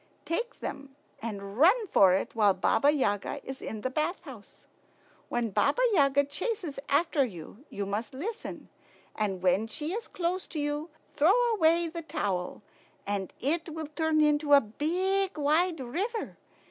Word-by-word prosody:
Take 470 Hz, +8 st, -3 dB
them 275 Hz, -1 st, -6 dB, 0.3 s
and 200 Hz, -1 st, -6 dB
run 405 Hz, -, +5 dB
for 195 Hz, -, +6 dB
it 190 Hz, +2 st, 0 dB
while 210 Hz, -4 st, +4 dB
Baba 280 Hz, +9 st, +3 dB
Yaga 255 Hz, -3 st, -1 dB
is 265 Hz, 0 st, -7 dB
in 215 Hz, -, -5 dB
the 255 Hz, -, -1 dB
bath 310 Hz, +6 st, -1 dB
house. 260 Hz, -, -13 dB, 0.6 s
When 235 Hz, -2 st, -1 dB
Baba -, -, +2 dB
Yaga 285 Hz, -4 st, +4 dB
chases 300 Hz, -, -4 dB
after 295 Hz, 0 st, +3 dB
you, 210 Hz, -, -8 dB
you 200 Hz, -, -4 dB
must 205 Hz, +3 st, -3 dB
listen; 420 Hz, -, -6 dB, 0.5 s
and 195 Hz, -4 st, -2 dB
when 190 Hz, +4 st, +2 dB
she 300 Hz, +9 st, -4 dB
is 455 Hz, +2 st, -4 dB
close 365 Hz, +1 st, -2 dB
to 315 Hz, -, -5 dB
you, 295 Hz, +2 st, -2 dB, 0.2 s
throw 350 Hz, +11 st, +4 dB
away 335 Hz, -3 st, +3 dB
the 335 Hz, +1 st, -6 dB
towel, 195 Hz, -, -3 dB, 0.4 s
and 200 Hz, -2 st, -2 dB
it 325 Hz, +6 st, -1 dB
will 320 Hz, 0 st, -5 dB
turn 310 Hz, +1 st, +1 dB
into 295 Hz, -1 st, +3 dB
a 285 Hz, -, +10 dB
big, 365 Hz, -, -1 dB
wide 320 Hz, +4 st, +2 dB
river. 380 Hz, -, -3 dB
295 Hz, 155 wpm, -29 LUFS, 220-340 Hz, 0.6 s, a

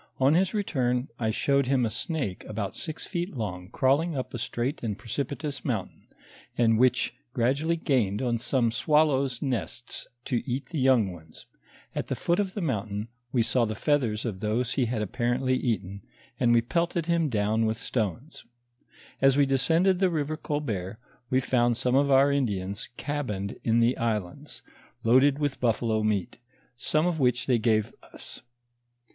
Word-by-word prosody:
On 135 Hz, +2 st, +4 dB
his 185 Hz, +2 st, +3 dB
return, 130 Hz, -10 st, 0 dB
I 110 Hz, -2 st, 0 dB
showed 140 Hz, +4 st, +1 dB
him 130 Hz, -2 st, +2 dB
a 110 Hz, -, -2 dB
snake 130 Hz, -, -3 dB
about 105 Hz, -2 st, -4 dB
six 155 Hz, -2 st, -5 dB
feet 175 Hz, -4 st, -4 dB
long 90 Hz, -5 st, -4 dB
crawling 140 Hz, +6 st, +1 dB
up 130 Hz, -, -4 dB
a 120 Hz, -, -4 dB
straight 120 Hz, +5 st, -2 dB
and 105 Hz, -4 st, -3 dB
precipitous 140 Hz, +5 st, -4 dB
mountain 115 Hz, -9 st, -4 dB, 0.5 s
and 115 Hz, -2 st, +3 dB
which 125 Hz, -1 st, +3 dB, 0.2 s
gradually 140 Hz, +8 st, +1 dB
gained 125 Hz, -, +1 dB
on 120 Hz, -2 st, 0 dB
some 120 Hz, -1 st, +1 dB
swallows' 140 Hz, -1 st, +2 dB
nests 125 Hz, -2 st, -4 dB, 0.2 s
to 125 Hz, -4 st, 0 dB
eat 130 Hz, +3 st, -2 dB
the 165 Hz, -, -3 dB
young 130 Hz, -7 st, +4 dB
ones; 80 Hz, -2 st, -12 dB, 0.5 s
at -, -, -3 dB
the -, -, -2 dB
foot 175 Hz, +3 st, 0 dB
of 195 Hz, -2 st, -1 dB
the 205 Hz, -, -2 dB
mountain, 105 Hz, -, -2 dB, 0.2 s
we 120 Hz, -3 st, +2 dB
saw 120 Hz, +2 st, +2 dB
the 110 Hz, -1 st, -1 dB
feathera 120 Hz, -5 st, 0 dB
of 105 Hz, -5 st, -3 dB
those 115 Hz, +4 st, -1 dB
he 130 Hz, -, +1 dB
had 115 Hz, -2 st, -1 dB
apparently 120 Hz, +4 st, 0 dB
eaten, 100 Hz, -6 st, -2 dB, 0.4 s
and 120 Hz, -2 st, +3 dB
we 120 Hz, -1 st, +4 dB
pelted 170 Hz, +5 st, 0 dB
him 170 Hz, -2 st, +1 dB
down 110 Hz, 0 st, +1 dB
with 110 Hz, 0 st, -1 dB
stones. 120 Hz, -, -3 dB, 0.8 s
As 135 Hz, 0 st, +5 dB
we 145 Hz, -, +5 dB
descended 165 Hz, +8 st, +3 dB
the 190 Hz, -1 st, +3 dB
river 155 Hz, -2 st, -1 dB
Colbert, 110 Hz, -, -3 dB, 0.3 s
we 130 Hz, -, +3 dB
found 120 Hz, -2 st, +2 dB
some 125 Hz, 0 st, 0 dB
of 140 Hz, +1 st, +3 dB
our 135 Hz, +1 st, +5 dB
Indians 100 Hz, -7 st, -2 dB
cabined 105 Hz, -10 st, -3 dB
in 115 Hz, 0 st, +3 dB
the 120 Hz, +2 st, +3 dB
islands, 115 Hz, +4 st, -3 dB, 0.4 s
loaded 130 Hz, +4 st, +5 dB
with 145 Hz, -3 st, -2 dB
buffalo 115 Hz, -2 st, +1 dB
meat, 105 Hz, +1 st, -1 dB, 0.4 s
some 155 Hz, +5 st, +1 dB
of 175 Hz, -3 st, 0 dB
which 125 Hz, -2 st, +2 dB
they 125 Hz, -3 st, +2 dB
gave 110 Hz, -1 st, +1 dB
us. -, -, -12 dB
125 Hz, 165 wpm, -27 LUFS, 110-145 Hz, 0.8 s, As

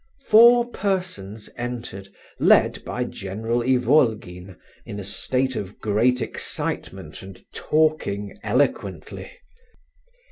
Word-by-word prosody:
Four 235 Hz, +2 st, +7 dB
persons 180 Hz, -, -3 dB
entered, 120 Hz, -5 st, -5 dB, 0.3 s
led -, -, +4 dB
by -, -, -3 dB
General 110 Hz, +5 st, -3 dB
Ivolgin, 115 Hz, -, +1 dB, 0.3 s
in 100 Hz, -, -7 dB
a -, -, -5 dB
state 130 Hz, +6 st, -1 dB
of 100 Hz, 0 st, -5 dB
great 115 Hz, +4 st, +2 dB
excitement, 95 Hz, -5 st, -5 dB
and 95 Hz, -1 st, -11 dB
talking 150 Hz, -11 st, 0 dB
eloquently. 125 Hz, +7 st, -1 dB
115 Hz, 95 wpm, -23 LUFS, 100-130 Hz, 0.3 s, Four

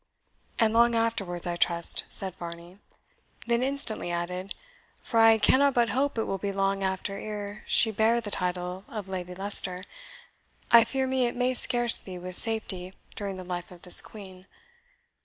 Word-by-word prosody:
"And 225 Hz, -1 st, +2 dB
long 235 Hz, +1 st, +4 dB
afterwards, 200 Hz, -6 st, -1 dB
I 175 Hz, -1 st, -2 dB
trust," 170 Hz, -1 st, -1 dB
said 190 Hz, -2 st, -3 dB
Varney; 170 Hz, +1 st, -10 dB, 0.7 s
then 235 Hz, 0 st, +1 dB
instantly 265 Hz, -8 st, 0 dB
added, 180 Hz, +2 st, -4 dB, 0.5 s
"For 230 Hz, -, 0 dB
I 225 Hz, 0 st, +7 dB
cannot 275 Hz, +5 st, +3 dB
but 240 Hz, -1 st, +3 dB
hope 270 Hz, +4 st, -1 dB
it 225 Hz, -, +1 dB
will 195 Hz, -, -3 dB
be 200 Hz, +1 st, -3 dB
long 195 Hz, 0 st, -1 dB
after 190 Hz, +1 st, -2 dB
ere 205 Hz, -1 st, -6 dB
she 225 Hz, -, +4 dB
bear 220 Hz, +3 st, +2 dB
the 215 Hz, -3 st, -6 dB
title 180 Hz, 0 st, -2 dB
of 210 Hz, -4 st, -7 dB
Lady 180 Hz, -1 st, -6 dB
Leicester 185 Hz, -1 st, +1 dB, 0.9 s
I 235 Hz, -1 st, +8 dB
fear 265 Hz, 0 st, -1 dB
me 260 Hz, -1 st, +1 dB
it 240 Hz, -, -5 dB
may 250 Hz, +1 st, +1 dB
scarce 240 Hz, -1 st, +2 dB
be 185 Hz, -2 st, -9 dB
with 180 Hz, 0 st, -7 dB
safety 195 Hz, -5 st, -1 dB, 0.2 s
during 200 Hz, -2 st, -4 dB
the 185 Hz, -, -7 dB
life 175 Hz, -1 st, -6 dB
of 180 Hz, -2 st, -15 dB
this 180 Hz, -, +7 dB
Queen. 190 Hz, -3 st, -12 dB
200 Hz, 170 wpm, -27 LUFS, 180-230 Hz, 0.9 s, I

